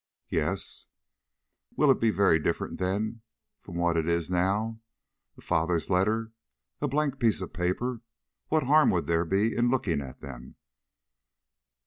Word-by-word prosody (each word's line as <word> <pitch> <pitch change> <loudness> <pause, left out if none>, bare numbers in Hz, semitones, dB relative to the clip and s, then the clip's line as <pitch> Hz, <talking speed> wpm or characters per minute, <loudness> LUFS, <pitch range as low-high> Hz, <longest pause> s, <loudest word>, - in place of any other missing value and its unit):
"Yes." 85 +5 -1 0.9
"Will 150 -2 +5
it 130 - +2
be 115 - +3
very 100 -6 +3
different 75 - -2
then 105 +5 -2 0.4
from 90 - -10
what 85 -1 +1
it 80 +1 0
is 85 +1 0
now? 100 +5 0 0.6
A - - -14
father's 85 +1 0
letters! 110 +5 +1 0.5
a 145 - +1
blank 140 -1 0
piece 115 -4 +3
of 95 - -6
paper! 110 +7 -2 0.5
What 155 0 +2
harm 150 +4 +5
would 90 -3 +1
there 85 0 +1
be 100 +6 +1
in 120 0 +2
looking 100 - 0
at 65 -2 -9
them?" 65 -2 -10
95 Hz, 145 wpm, -28 LUFS, 85-115 Hz, 0.9 s, Will